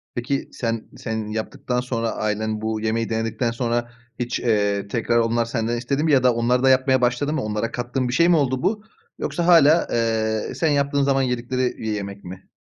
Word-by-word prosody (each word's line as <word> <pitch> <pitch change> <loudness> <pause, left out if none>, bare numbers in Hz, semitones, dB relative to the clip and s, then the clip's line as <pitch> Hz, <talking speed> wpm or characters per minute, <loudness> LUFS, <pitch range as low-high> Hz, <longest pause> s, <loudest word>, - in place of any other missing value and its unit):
Peki, 125 +3 -2
sen, 115 -2 -3
sen 110 -1 -4
yaptıktan 115 +3 -3
sonra 115 -2 -2
ailen 110 0 -2
bu 110 0 -2
yemeği 115 +1 -1
denedikten 115 +1 -1
sonra 120 0 -2 0.3
hiç, 120 -1 -2
eee, 100 -3 +1
tekrar 115 +2 0
onlar 115 0 +2
senden 115 0 -2
istedi 135 +5 -1
mi 160 - +2
ya 135 -3 +4
da 125 -1 +5
onlar 120 +2 +1
da 135 - +5
yapmaya 130 0 +3
başladı 125 +5 +1
mı? 155 - -1
Onlara 105 +1 -2
kattığın 125 +1 -2
bir 125 - -3
şey 170 +5 +4
mi 175 - +5
oldu 130 -3 0
bu 210 +3 0 0.4
yoksa 175 -1 -2
hâlâ, 165 -2 +6
eee, 110 -2 0
sen 160 - +1
yaptığın 140 -1 +1
zaman 135 -1 +2
yedikleri 125 0 -1
bir 110 - -3
yemek 100 -1 -5
mi? 95 +1 -10
120 Hz, 195 wpm, -22 LUFS, 110-130 Hz, 0.4 s, hâlâ